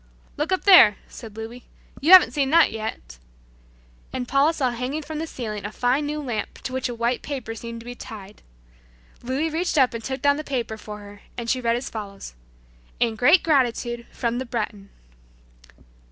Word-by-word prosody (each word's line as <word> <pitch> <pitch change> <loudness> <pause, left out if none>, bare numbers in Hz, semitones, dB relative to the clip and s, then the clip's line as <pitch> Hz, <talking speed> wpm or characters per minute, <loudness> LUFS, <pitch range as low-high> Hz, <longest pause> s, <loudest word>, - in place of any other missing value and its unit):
"Look 300 +5 -2
up 375 - 0
there," 350 - +8
said 220 -3 -11
Louis, 230 +3 -8 0.4
"you 310 +6 +2
haven't 370 -1 +9
seen 275 -3 +1
that 330 0 +5
yet," 215 - -6 0.9
and 250 -1 -4
Paula 275 +4 +3
saw 270 -6 0
hanging 255 +6 -3
from 305 0 -6
the 325 - -3
ceiling 215 -8 -5
a 205 - -5
fine 255 +6 0
new 300 +1 -3
lamp 240 -5 -4
to 255 - -5
which 260 -1 -2
a 240 - -5
white 235 +1 -1
paper 260 -6 -5
seemed 230 +1 -8
to - - -15
be 245 - -6
tied. 210 -5 -11 0.8
Louis 270 +6 -2
reached 330 +1 -1
up 260 -4 +4
and 230 -1 -5
took 265 +2 -4
down 285 0 +4
the 305 - -4
paper 245 -6 -3
for 210 -1 -9
her, 205 0 -13 0.2
and 235 -1 -5
she 255 - 0
read 230 -1 +1
as 245 - -4
follows: 200 - -7 0.7
"In 235 -2 +1
great 290 +10 +5
gratitude 240 -5 0
from 240 0 -2
the 260 - -4
Breton." 210 -4 -4
245 Hz, 190 wpm, -24 LUFS, 225-285 Hz, 0.9 s, haven't